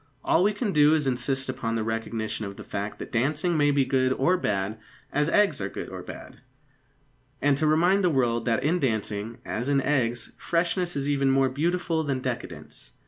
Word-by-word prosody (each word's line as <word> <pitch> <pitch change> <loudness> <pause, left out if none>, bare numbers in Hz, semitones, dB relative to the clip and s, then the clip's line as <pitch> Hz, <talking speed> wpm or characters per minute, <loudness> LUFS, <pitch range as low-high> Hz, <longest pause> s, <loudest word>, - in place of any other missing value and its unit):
All 170 - +4
we 205 - +4
can 210 0 -2
do 150 0 +5
is 155 - +1
to 135 - +1
insist 130 +2 -1
upon 125 -3 -2
the 110 - -1
recognition 110 0 -3
of 100 0 -9
the - - -8
fact 100 +1 -4
that - - -8
dancing 150 +8 0
may 145 -1 +3
be 140 -2 +3
good 130 0 +2
or 135 +8 +2
bad, 105 - -2 0.3
as 150 +2 +2
eggs 210 +3 +3
are - - -2
good - - -6
or - - -7
bad, - - -10 1.0
and 145 -1 +3
to 155 - +1
remind 175 +6 +3
the 180 - +4
world 120 -6 +1
that 120 +1 +1
in 165 +5 +2
dancing, 110 -3 -2
as 120 +5 -3
in 140 -1 +3
eggs, 125 -4 0
freshness 175 +1 0
is 140 0 -2
even 140 -1 +2
more 135 0 +3
beautiful 165 +3 0
than 140 -3 -1
decadence. 120 - -6
135 Hz, 200 wpm, -26 LUFS, 115-160 Hz, 1.0 s, do